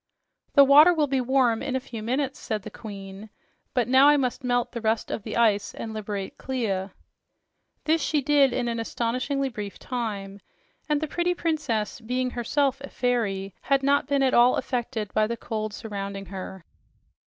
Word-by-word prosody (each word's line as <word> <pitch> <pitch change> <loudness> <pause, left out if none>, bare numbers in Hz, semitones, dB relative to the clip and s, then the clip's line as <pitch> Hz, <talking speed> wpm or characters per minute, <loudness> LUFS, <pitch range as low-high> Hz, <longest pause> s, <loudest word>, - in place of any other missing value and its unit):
"The 280 - +9
water 300 +6 +7
will 305 -2 +3
be 270 -2 0
warm 250 -3 +2
in 270 -1 -2
a - - +1
few 245 -4 -8
minutes," 260 +4 -2
said 215 -4 -3
the - - -8
Queen. 200 -1 -9 0.5
"But 245 -3 +2
now 260 +3 +6
I 295 0 +6
must 255 -2 -1
melt 245 -1 0
the 235 - -5
rest 220 0 0
of - - -3
the 215 +2 -5
ice 210 -3 +2
and 220 -1 -6
liberate 205 -2 -5
Clia." 205 -7 -2 0.9
This 320 +1 +2
she 300 +1 +1
did 280 -1 +4
in 245 0 -1
an 235 -1 -2
astonishingly 255 +5 -1
brief 210 -5 -7
time, 205 -5 -4 0.5
and 300 0 +1
the 310 - -1
pretty 350 +3 0
princess, 275 -13 -1
being 250 +2 -1
herself 270 +3 0
a 280 - -7
fairy, 200 -6 -1
had 275 0 +1
not 280 +1 +2
been 280 -1 +2
at 260 - +2
all 240 +1 +6
affected 240 -5 -3
by 215 0 +2
the 235 +1 -3
cold 215 -1 -4
surrounding 200 -2 -6
her. 190 -1 -8
240 Hz, 180 wpm, -25 LUFS, 215-275 Hz, 0.9 s, The